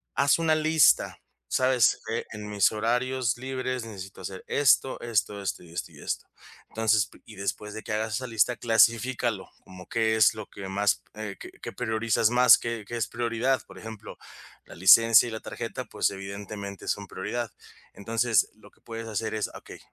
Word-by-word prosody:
Haz 140 +2 +3
una 160 -1 +3
lista, 155 -4 +3 0.3
¿sabes? 130 -4 +3
Eh: 115 - -2
"En 105 -1 -7
mis 105 -1 +3
horarios 120 +2 0
libres 130 -1 -3
necesito 95 -3 -9
hacer 95 0 -7
esto, 135 -2 +3
esto, 110 -3 -1
esto 95 -1 -3
y 85 - -15
esto 85 - -5
y - - -16
esto". - - -3 0.4
Entonces, 110 -2 +2
p - - -19
y 110 - -13
después 105 +1 -4
de 110 - -7
que 110 - -4
hagas 110 0 -1
esa 130 +4 -3
lista, 115 +1 +2
clasifícalo 115 -1 +2 0.2
como 90 0 -13
qué 110 -1 +1
es 110 -1 +5
lo 110 -2 -8
que 100 -1 -9
más, 100 +2 +1
eh, 105 -2 -6
qué - - -9
qué - - -6
priorizas 110 0 +1
más, 125 0 +7
qué 115 -3 -5
qué 120 - -4
es 115 - -1
prioridad. 120 +3 0
Por - - -13
ejemplo, 110 -1 -9 0.5
la - - -13
licencia 115 +7 +7
y - - -8
la 110 - -6
tarjeta, - - -6
pues - - 0
evidentemente 100 0 -7
son 100 - -1
prioridad. 115 +5 -4 0.4
Entonces, 115 +1 +1
lo 110 - -18
que - - -31
puedes 115 0 -7
hacer 110 0 -3
es, 110 - -2
okey - - -11
110 Hz, 185 wpm, -27 LUFS, 105-120 Hz, 0.5 s, más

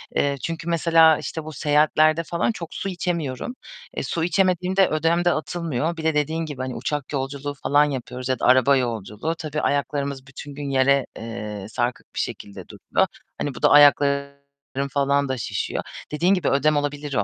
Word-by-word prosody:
eee, 140 0 +2
çünkü 165 0 -4
mesela 165 -1 +5
işte 160 - -5
bu 155 0 -8
seyahatlerde 155 +3 +3
falan 170 +7 0
çok 170 -7 -8
su 195 - -4
içemiyorum. 170 - -3 0.4
Eee, - - -1
su 165 - -2
içemediğimde 185 +1 +2
ödem 165 +3 +1
de 175 - +5
atılmıyor. 165 -1 -2
Bir 160 - -6
de 160 -1 +2
dediğin 160 +2 0
gibi 145 -4 -6
hani 130 -1 -4
uçak 145 -1 -3
yolculuğu 140 +1 -3
falan 145 +1 +3
yapıyoruz 130 -2 -5
ya 130 -2 0
da - - -1
araba 130 +2 +5
yolculuğu. 115 - -3
Tabii 155 -3 -3
ayaklarımız 140 -1 -1
bütün 140 +2 -10
gün 145 -1 -5
yere, 135 0 +3
eee, 105 -3 -6
sarkık 120 +2 -3
bir - - -2
şekilde 100 - -5
duruyor. - - 0 0.3
Hani 145 -3 -3
bu - - -9
da - - +5
ayaklarım 140 -1 +5 0.5
falan 140 0 +1
da 130 - -1
şişiyor. 110 - -3 0.3
Dediğin 170 +6 +2
gibi, 180 -6 +1
ödem 145 +2 +2
olabilir 145 0 -3
o. 105 - +2
145 Hz, 180 wpm, -23 LUFS, 135-160 Hz, 0.5 s, mesela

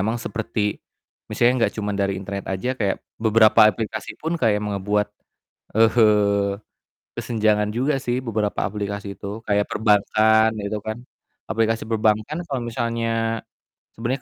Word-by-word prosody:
emang 110 +4 0
seperti 110 -2 -3 0.5
misalnya 120 0 +2
gak - - -12
cuma 105 -1 -2
dari 100 -1 0
internet 100 +1 -6
aja 95 +7 -2
kayak, 100 -5 0 0.3
beberapa 110 -1 +6
aplikasi 110 0 -5
pun 165 +2 -2
kayak 110 -4 +3
me 105 -1 -2
ngebuat, 105 +2 0 0.7
eee, 105 -3 +4 0.7
kesenjangan 105 -2 +1
juga 135 +5 +1
sih, 120 -1 -1
beberapa 105 -3 -1
aplikasi 100 -1 -5
itu, 100 +2 -6
kayak 105 0 +2
perbankan, 110 +1 +3
itu 100 +1 -3
kan. 110 +1 -4 0.5
Aplikasi 115 +1 +1
perbankan 110 +9 0
kalo 135 -5 -3
misalnya 115 -1 -1 0.6
sebenernya 125 +4 -2
110 Hz, 130 wpm, -22 LUFS, 105-115 Hz, 0.7 s, beberapa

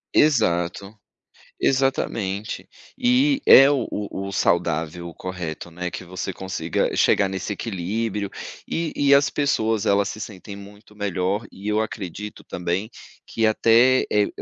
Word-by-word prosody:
Exato. 95 - +2 0.6
Exatamente. 110 -6 -1 0.3
E 265 +3 +3
é 135 +1 +9
o 140 - 0 0.2
o 100 0 -5
saudável, 85 -2 0
o - - -12
correto, 90 -2 -6
né, 90 +1 -4
que - - -7
você 90 +1 -5
consiga 95 -3 -2
chegar 100 - +3
nesse 95 +2 -4
equilíbrio. 105 +1 -3 0.4
E 165 -2 -2
e 140 -1 +5
as 140 0 +4
pessoas 115 -7 0
elas 100 0 +3
se - - -7
sentem 100 -1 -8
muito 105 +1 -14
melhor, 100 +1 -2
e 100 +2 -9
eu 105 +1 +2
acredito 105 -1 -6
também, 90 +6 -3 0.3
que 115 -1 0
até, 115 +4 +4
eh, 105 -1 +3
100 Hz, 135 wpm, -23 LUFS, 90-115 Hz, 0.6 s, é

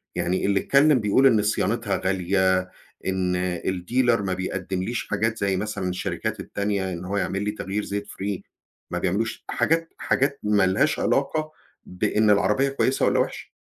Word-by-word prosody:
يعني 90 +2 0
اللي 100 0 +2
اتكلم 140 +2 +4
بيقول 105 +6 +4
إن 110 -5 +4
صيانتها 105 0 0
غالية، 95 0 +1 0.4
إن 95 -1 0 0.3
الdealer 115 +6 +1
ما 95 -2 -1
بيقدمليش 95 +4 -3
حاجات 110 +2 0
زي 95 -1 0
مثلًا 100 -2 -3
الشركات 90 - -3
التانية 100 -2 -2
إن 85 +1 -6
هو 100 +2 -2
يعملي 100 +2 -1
تغيير 105 0 -3
زيت 100 0 -4
free، 100 0 -4 0.5
ما - - -1
بيعملوش. 105 +5 -1
حاجات 165 +1 0
حاجات 140 +1 0
ما 105 -2 +3
لهاش 140 +11 +2
علاقة 155 +3 0 0.3
بإن 105 +4 +1
العربية 130 +7 +3
كويسة 135 -1 +1
والّا - - +2
وحشة. - - -3
100 Hz, 150 wpm, -24 LUFS, 95-115 Hz, 0.5 s, اتكلم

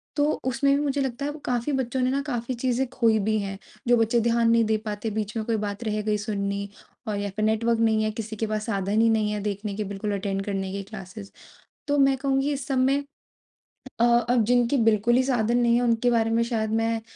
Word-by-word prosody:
तो 290 0 +2
उसमें 265 +2 +2
भी 285 - 0
मुझे 285 -1 0
लगता 265 +1 -3
है 290 - -1
वो 300 - -9
काफ़ी 245 +3 -1
बच्चों 260 -1 -1
ने 255 - +2
ना 275 +1 0
काफ़ी 245 -2 -2
चीज़ें 250 +1 0
खोईं 225 -5 +2
भी 215 0 +1
हैं 195 -1 -4 0.3
जो 240 0 +5
बच्चे 230 +1 +2
ध्यान 230 0 +2
नहीं 230 0 +4
दे 220 0 +1
पाते, 210 +1 -3
बीच 215 0 -3
में 220 - -2
कोई 230 - 0
बात 205 +1 -4
रह 215 -1 -1
गई 210 0 0
सुननी 200 -1 -3 0.4
और 210 -1 -1
या 205 0 -2
फिर 215 0 0
नेटवर्क 225 +1 +1
नहीं 220 -1 +2
है 215 - 0
किसी 220 0 -6
के 220 +1 -2
पास 215 0 -2
साधन 200 0 0
ही 230 - +4
नहीं 215 -1 +1
है 210 - -2
देखने 205 0 -3
के 215 - -2
बिल्कुल 205 +1 -3
अटेंड 195 0 -2
करने 195 -2 -3
की 200 +1 -4
क्लासेस। 195 0 -10 0.6
तो 290 0 +2
मैं 275 -1 +4
कहूँगी 270 +1 0
इस 275 -2 -4
सब 270 -2 0
में 275 +2 +2 1.0
अ, - - +3
अब 240 0 +3
जिनके 245 +3 +2
बिल्कुल 225 +1 +3
ही 255 - +5
साधन 240 -3 +1
नहीं 235 -1 +3
है 240 - +2
उनके 235 0 +2
बारे 225 -1 +2
में 230 +1 +2
शायद 225 -2 -1
मैं 225 0 0
225 Hz, 240 wpm, -25 LUFS, 210-245 Hz, 1.0 s, जो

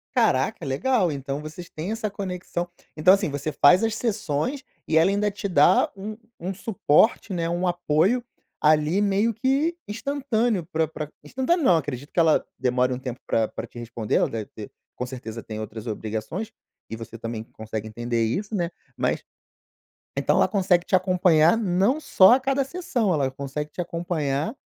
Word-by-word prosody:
Caraca, - - +2
legal 180 - +1
então, 140 0 -4
vocês 155 +3 -9
têm 165 +6 -5
essa 220 -1 -2
conexão 180 -3 -4 0.3
Então, 175 +5 +6
assim, 200 -3 +1
você 145 +2 -3
faz 175 +8 +5
as 225 -1 +1
sessões 225 - -2 0.2
e 160 - +2
ela 165 +4 +5
ainda 205 +1 +1
te 200 0 -4
dá 180 - +4
um 210 +2 -6 0.2
um 185 +3 -3
suporte, 195 +1 +2
né, 170 -2 -1
um 175 +2 0
apoio 175 +7 +2 0.4
ali 155 +5 +3
meio 205 +3 +2
que 275 +8 +1
instantâneo, 230 - -1
pra 160 -1 0
pra 150 -1 -6
instantâneo 265 +7 0
não, 180 -10 +5
acredito 145 -2 -5
que - - 0
ela 160 -2 +4
demore 125 0 +1
um 125 - -2
tempo 125 -2 -6
pra 110 -1 +1
pra - - -7
te - - -15
responder. 115 -2 -3
Ela - - +3
deve 110 -2 -4
ter 105 - -10 0.2
com 125 - -3
certeza 120 -3 -7
tem 110 -1 -6
outras 110 +1 -7
obrigações, 110 - -4 0.4
e - - -4
você 115 0 -9
também 115 -1 -5
consegue 110 -1 -6
entender 120 +1 -1
isso, 200 - -3
né, 175 -3 0 0.3
mas - - 0 0.9
então - - +2
ela - - +5
consegue 185 -3 +2
te - - -2
acompanhar 180 -2 +4
não 200 +6 +2
só 190 -7 +6
a 260 - +2
cada 270 +1 +1
sessão, 265 - -1
ela 140 -5 +1
consegue 140 +2 -5
te 180 - -6
acompanhar 165 - -2
175 Hz, 175 wpm, -24 LUFS, 135-205 Hz, 0.9 s, Então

